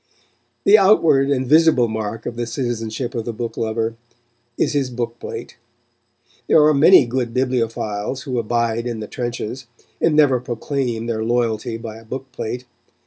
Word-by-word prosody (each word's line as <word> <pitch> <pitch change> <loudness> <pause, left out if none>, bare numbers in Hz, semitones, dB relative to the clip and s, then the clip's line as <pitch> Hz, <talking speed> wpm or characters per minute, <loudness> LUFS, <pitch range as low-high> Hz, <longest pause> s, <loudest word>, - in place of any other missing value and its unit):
The 210 +2 +7
outward 165 -9 +4
and 130 -2 +1
visible 155 -3 +4
mark 110 0 -4
of 115 - -4
the 120 0 -3
citizenship 120 -1 -3
of 115 -2 -3
the 115 - -4
book 115 +1 -5
lover 115 0 -2 0.6
is - - +1
his 140 -3 0
book 120 -1 -4
plate. - - -7 0.9
There 155 - +6
are 155 - +5
many 150 +1 +7
good 120 0 -3
bibliophiles 120 -2 -1
who 130 -4 -2
abide 115 +1 -1
in 115 -2 -4
the 110 - -5
trenches, 120 0 -5 0.3
and 165 -2 +3
never 140 -4 +4
proclaim 120 -1 -3
their 110 -2 -2
loyalty 115 -1 -1
by 115 -1 -8
a 115 - -13
book 130 +3 -7
plate. 125 +1 -5
120 Hz, 160 wpm, -20 LUFS, 115-135 Hz, 0.9 s, The